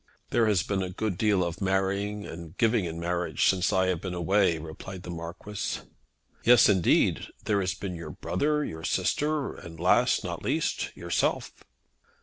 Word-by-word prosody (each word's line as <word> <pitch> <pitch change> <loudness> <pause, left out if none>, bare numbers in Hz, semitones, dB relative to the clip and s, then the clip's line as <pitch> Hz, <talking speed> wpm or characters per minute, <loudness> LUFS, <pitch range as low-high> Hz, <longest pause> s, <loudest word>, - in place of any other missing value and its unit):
"There 115 -2 +3
has 100 -5 +3
been 100 0 -1
a 95 - -2
good 100 +1 -2
deal 100 -1 +2
of 85 +2 -4
marrying 100 +2 0
and 80 -1 -9
giving 115 -4 +2
in 85 0 -5
marriage 85 +1 0
since 95 0 +2
I 95 0 +3
have 90 -3 -1
been 90 -2 -4
away," 90 0 +2
replied 80 +4 -8
the 90 - -6
Marquis. 85 +5 -5 0.6
"Yes, 120 0 +7
indeed. 95 -5 +3 0.2
There 105 -2 +2
has 95 -1 -1
been 95 -3 -5
your 85 -2 -7
brother, 150 - -1
your 80 0 -7
sister, 150 - 0
and 80 -1 -11
last, 90 +2 +3
not - - -4
least, - - -1
yourself." - - 0
95 Hz, 165 wpm, -28 LUFS, 85-105 Hz, 0.6 s, Yes